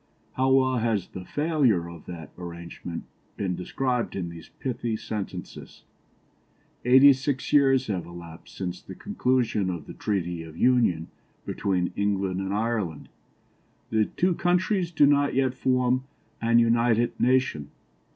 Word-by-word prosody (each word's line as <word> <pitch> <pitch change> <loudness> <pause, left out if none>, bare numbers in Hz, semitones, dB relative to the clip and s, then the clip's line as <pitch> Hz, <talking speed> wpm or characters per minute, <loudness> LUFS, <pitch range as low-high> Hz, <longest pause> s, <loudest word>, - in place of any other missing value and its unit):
How 130 +1 +1
well 130 -1 +4
has 110 -5 0
the 95 - -8
"failure" 140 - +1
of 85 -2 -11
that 85 -3 -8
arrangement 85 -1 -7 0.3
been 95 -3 -1
described 125 +7 -2
in 90 -3 -3
these 85 -1 -11
pithy 120 -3 -3
sentences 105 -4 -7 1.0
"Eighty 130 +3 +8
six 135 +1 -3
years 135 -2 +5
have 95 -6 -3
elapsed 85 -1 -11
since 90 -1 -4
the 95 - -10
conclusion 125 - 0
of 85 -4 -4
the - - -9
Treaty 90 -5 -2
of 80 -1 -10
Union 115 -10 +2 0.4
between 90 -3 -1
England 100 -2 0
and 95 0 -3
Ireland. 105 -7 -2 0.8
The 110 -1 +3
two 180 - 0
countries 180 +1 +1
do 150 -3 +4
not 145 -1 +3
yet 130 -1 +2
form 130 0 +1 0.4
an 115 0 +3
united 115 0 +3
nation. 125 - +1
115 Hz, 135 wpm, -26 LUFS, 90-130 Hz, 1.0 s, Eighty